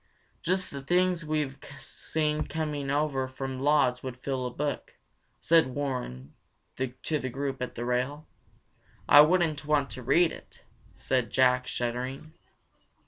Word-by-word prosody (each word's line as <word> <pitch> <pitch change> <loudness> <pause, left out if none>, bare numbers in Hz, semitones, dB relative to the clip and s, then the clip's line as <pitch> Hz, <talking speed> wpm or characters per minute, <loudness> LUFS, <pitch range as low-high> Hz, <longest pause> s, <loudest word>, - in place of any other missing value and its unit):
"Just 185 +2 0
the 140 - -6
things 180 +3 +2
we 155 0 0
have 135 -1 -5 0.2
seen 150 +2 -2
coming 150 -3 -3
over 140 -2 0
from 130 0 -5
Lodz 140 -3 +3
would 130 -2 -6
fill 130 -1 -2
a - - -3
book," 145 +3 -4 0.4
said 160 -6 +3
Warren 125 - -4 0.4
to 130 +4 -2
the 130 - -3
group 135 +1 -4
at 125 - -4
the 120 - -4
rail. 125 +5 -1 0.8
"I 145 - +10
wouldn't 160 -2 +3
want 145 -2 +1
to 130 - -7
read 170 +7 +4
it," - - -13 0.3
said 125 -4 0
Jack, 125 -1 +3
shuddering. 125 +5 -3
140 Hz, 140 wpm, -28 LUFS, 130-150 Hz, 0.8 s, I